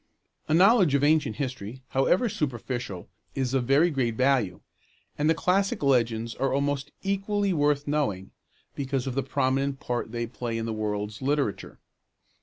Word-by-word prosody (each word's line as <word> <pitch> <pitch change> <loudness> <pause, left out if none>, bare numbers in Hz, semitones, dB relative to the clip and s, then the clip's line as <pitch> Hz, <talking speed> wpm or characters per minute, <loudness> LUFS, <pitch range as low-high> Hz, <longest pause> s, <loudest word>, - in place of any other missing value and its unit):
A 155 - +2
knowledge 190 - +5
of 140 - +2
ancient 150 -7 +3
history, 130 -2 -5
however 175 - +2
superficial, 120 - -4 0.3
is 130 -1 -1
of 130 -2 +1
very 145 +7 +4
great 125 -5 0
value; 130 -8 +1 0.5
and 150 +1 +1
the 165 - +4
classic 190 +1 +1
legends 115 -4 +1
are 135 - -1
almost 140 0 -1
equally 200 0 0
worth 145 -2 +1
knowing, 120 -11 -1 0.4
because 135 -2 -2
of 130 - -3
the 135 - 0
prominent 135 +1 0
part 120 -2 -3
they 120 0 -2
play 115 0 -4
in 115 - -3
the 115 - -2
world's 105 -1 -3
literature. 140 -5 -1
135 Hz, 155 wpm, -27 LUFS, 120-150 Hz, 0.5 s, knowledge